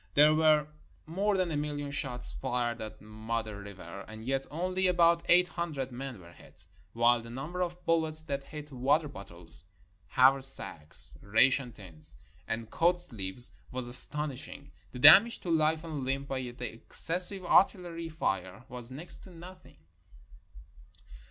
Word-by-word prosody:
There 150 +2 +5
were 155 -1 +2 0.4
more 195 +5 -2
than 185 -2 -2
a - - -4
million 145 -1 -5
shots 130 -3 -1
fired 120 -1 -4
at 110 -1 -10
Modder 110 -1 -7
River, 100 -1 -11
and 110 +1 -12
yet 135 +1 -3
only 185 +4 -2
about 170 -1 +2
eight 180 +1 +4
hundred 150 -7 -6
men 130 -2 -9
were 85 -1 -16
hit; 85 - -19 0.3
while 120 +1 +1
the 115 - -13
number 150 +9 -7
of 175 0 -6
bullets 160 -1 0
that 140 -3 -6
hit 150 0 -11
water 140 +5 -1
bottles, 85 - -13 0.4
haversacks, 130 - -1
ration 125 +5 0
tins, 80 -7 -8 0.3
and 115 -1 -6
coat 175 +1 0
sleeves 115 - -1 0.2
was 130 -1 -6
astonishing. 140 +2 +6 0.2
The - - -11
damage 195 - +6
to 175 - -5
life 160 0 0
and 155 -5 -7
limb 135 +1 -4
by 135 -1 -5
the 125 -1 -8 0.3
exces 170 +8 +6
sive 195 -3 +1
artillery 175 -3 0
fire 95 - -5
was 125 -1 -11
next 145 +7 -9
to - - -15
nothing. 180 +2 -15
140 Hz, 150 wpm, -28 LUFS, 115-165 Hz, 0.4 s, astonishing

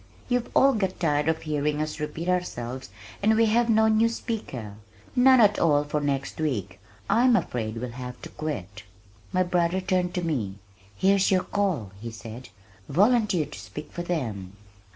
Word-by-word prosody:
"You've 245 -1 0
all 275 0 +6
got 190 -4 -1
tired 150 -2 +1
of 160 - -1
hearing 150 -1 -1
us 155 +1 -3
repeat 150 +3 -4
ourselves 130 -8 -2 0.3
and 220 +2 +4
we 225 +1 +4
have 235 +2 +2
no 220 0 +5
new 220 +1 +4
speaker, 135 - -5 0.4
none 260 +1 +6
at 210 -2 +5
all 145 -3 +3
for 150 0 -2
next 140 +1 -2
week. 120 - -2 0.3
I 225 +4 +3
am 250 -2 +6
afraid 115 - -2
we'll 125 +1 -4
have 125 0 -7
to - - -7
quit." 105 - -5 0.5
My 185 - +2
brother 175 0 +1
turned 185 -1 0
to 180 - -1
me 120 - -2 0.4
"Here's 195 - +3
your 185 -2 +3
'call,'" 180 - -1
he 115 - -5
said. 115 +3 -9 0.4
"Volunteer 210 -4 +3
to 145 0 -10
speak 150 - -9
for 175 - -5
them." 115 - -3
160 Hz, 170 wpm, -26 LUFS, 130-200 Hz, 0.5 s, all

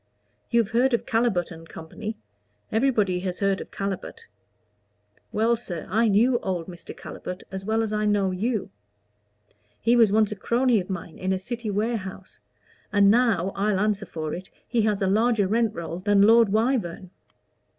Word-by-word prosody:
You've 230 -3 +2
heard 245 +2 +3
of - - -4
Calibut 225 -7 +1
& 165 - -16
Co. 210 +7 -7 0.6
everybody 215 -6 +2
has 180 -1 -3
heard 195 -1 0
of - - -9
Calibut. 195 -2 -5 1.1
Well, 225 +2 +2
sir, 180 -9 -5
I 225 +3 +3
knew 235 +4 +3
old 180 -3 -3
Mr. 175 -1 -10
Calibut 180 0 -7
as 190 0 -5
well 220 +1 +1
as 215 -1 -3
I 210 0 0
know 200 -2 +2
you. 210 - -2 1.1
He 235 +2 +3
was 225 -4 +5
once 215 0 +3
a - - -3
crony 240 +2 +2
of 185 - -6
mine 170 -3 -6
in 185 +1 -1
a 190 - +1
city 235 +4 -5
warehouse; 205 -3 -3 0.5
and 200 -1 +5
now, 220 -6 +2
I'll 200 -1 +1
answer 210 0 0
for 155 -2 -4
it, 185 +2 -7 0.2
he 235 - +1
has 210 -2 +1
a - - +2
larger 220 +1 +2
rent 225 +1 +1
roll 170 0 -5
than 200 +1 +3
Lord 225 0 +6
Wyvern. 215 -5 0
205 Hz, 170 wpm, -25 LUFS, 190-230 Hz, 1.1 s, Lord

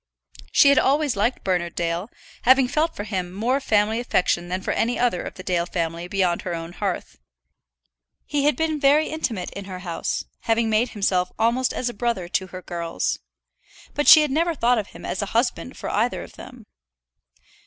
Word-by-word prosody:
She 280 - +6
had 280 - +6
always 285 -1 +2
liked 220 +5 0
Bernard 175 -3 -1
Dale, 170 +4 -2 0.3
having 260 +1 +5
felt 310 +5 0
for 205 - -4
him 185 -4 -3
more 235 +8 0
family 220 -3 +1
affection 180 -7 0
than 185 +1 -1
for - - -1
any 240 +2 0
other 240 -7 +1
of - - -7
the 185 - -9
Dale 175 -2 0
family 170 0 -3
beyond 180 -2 0
her 175 -2 -3
own 165 +1 -7
hearth. 180 - -4 1.1
He 285 -1 0
had 295 - +3
been 320 -1 -1
very 285 +3 +4
intimate 240 - -3
in 200 - -7
her 185 -1 -7
house, 170 -1 -3 0.2
having 225 0 +2
made 225 +3 +2
himself 185 -4 0
almost 235 +3 +2
as 250 - -2
a 240 - -2
brother 230 -6 -2
to 190 +1 -1
her 185 0 -9
girls. 170 -1 -3 0.7
But 295 - -1
she 310 -1 +10
had 300 - -1
never 330 +3 +1
thought 245 -3 +2
of 205 - -4
him - - -12
as 185 - -2
a 200 - -2
husband 230 - -1
for - - -4
either - - 0
of - - -13
them. - - -12
215 Hz, 195 wpm, -23 LUFS, 180-260 Hz, 1.1 s, she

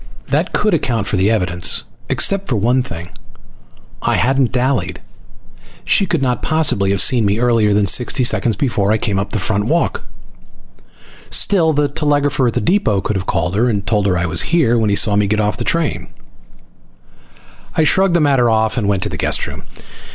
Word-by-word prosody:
That 155 +6 0
could 210 -2 0
account 120 -9 -1
for 100 - -1
the 95 +2 +1
evidence 90 -4 +1 0.3
except 195 0 0
for 125 - 0
one 120 +5 +1
thing. 85 -8 -8 0.9
I - - 0
hadn't 135 +1 +1
dallied. 125 -7 -1 0.9
She 195 - +2
could 135 - -1
not 125 -2 -1
possibly 150 -11 0
have 100 -1 0
seen 125 -4 +4
me 100 0 0
earlier 115 -3 +1
than 100 0 +2
sixty 125 +6 +3
seconds 120 -2 0
before 105 -4 -1
I 110 - +2
came 105 -3 -2
up 100 - -4
the - - -2
front 105 +1 -1
walk. 165 +8 -1 1.3
Still, 170 -6 +3
the 145 -1 0
telegrapher 145 -2 0
at 115 - -1
the - - -1
depot 140 - +1
could 105 +2 -3
have 95 0 -4
called 90 - -1
her 120 +4 +1
and 100 -4 -2
told 105 -1 0
her 90 -2 0
I 85 - -1
was 85 0 +1
here 160 -9 +1
when 110 -2 +1
he 100 - +1
saw 105 0 +3
me 100 0 +1
get 105 +1 -1
off 105 -1 -1
the - - -4
train. 165 -2 -2 1.7
I 160 - +3
shrugged 190 +3 +2
the - - +3
matter 135 -5 +2
off 110 +1 0
and 105 - -2
went 100 -2 0
to - - -1
the - - -6
guest - - 0
room. - - -9
115 Hz, 195 wpm, -16 LUFS, 100-140 Hz, 1.7 s, seen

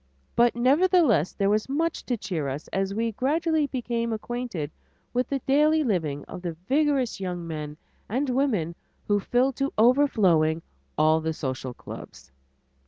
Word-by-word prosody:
But 235 0 +4
nevertheless, 275 - +4
there 200 0 +1
was 215 +4 0
much 325 +4 -1
to 245 - 0
cheer 175 -9 -3
us 140 +3 -5
as 195 0 -1
we 225 +3 -1
gradually 310 - +1
became 235 -3 -2
acquainted 220 - -4 0.4
with 250 +1 +1
the 275 - 0
daily 305 +3 +4
living 160 - -1
of - - -8
the 175 -2 -3
vigorous 280 -5 +1
young 180 -2 -4
men 150 -2 -5 0.3
and 260 +7 0
women 245 - 0 0.3
who 205 -1 +3
filled 250 +5 +1
to 275 0 0
overflowing 195 - +4 0.3
all 155 +1 +4
the 160 0 -1
social 130 -3 -4
clubs. 70 - -11
230 Hz, 150 wpm, -26 LUFS, 165-270 Hz, 0.4 s, But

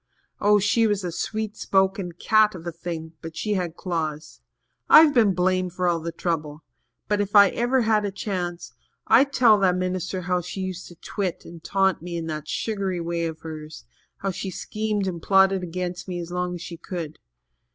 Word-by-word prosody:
Oh, 210 +1 +5
she 220 +3 +3
was 205 -2 0
a 175 - -3
sweet 215 +4 -3
spoken 190 -3 0
cat 215 +3 +3
of 170 -1 -10
a 170 - -3
thing 165 -1 -6
but 165 0 -8
she 210 - -1
had 175 -4 -2
claws. 160 -4 -4 0.5
I've 310 -2 +8
been 215 -7 +4
blamed 185 0 +1
for 180 0 -1
all 170 -1 +2
the 165 +1 -4
trouble. 155 -3 -3 0.4
But 210 -1 +1
if 205 +1 -3
ever 240 +6 +5
I - - +1
had 215 -1 +2
a 200 - -2
chance, 180 -3 -4 0.3
I'd 265 +5 +5
tell 230 -6 +5
that 185 -2 +3
minister 185 0 -2
how 180 0 0
she 180 +3 -6
used 185 -1 -5
to 175 - -13
twit 190 +1 -4
and 170 -1 -11
taunt 190 -3 +1
me 170 0 -5
in 165 - -4
that 155 -1 -5
sugary 195 -5 -2
way 170 0 -2
of 160 -1 -7
hers 155 - -8 0.3
how 195 - -2
she 190 +1 -5
schemed 210 +2 -2
and 175 -3 -4
plotted 190 0 +4
against 180 +1 -4
me 180 -1 -4
as 170 0 -6
long 180 0 -2
as 175 - -7
she 170 - -7
could. 165 -3 -6
185 Hz, 195 wpm, -24 LUFS, 170-200 Hz, 0.5 s, I've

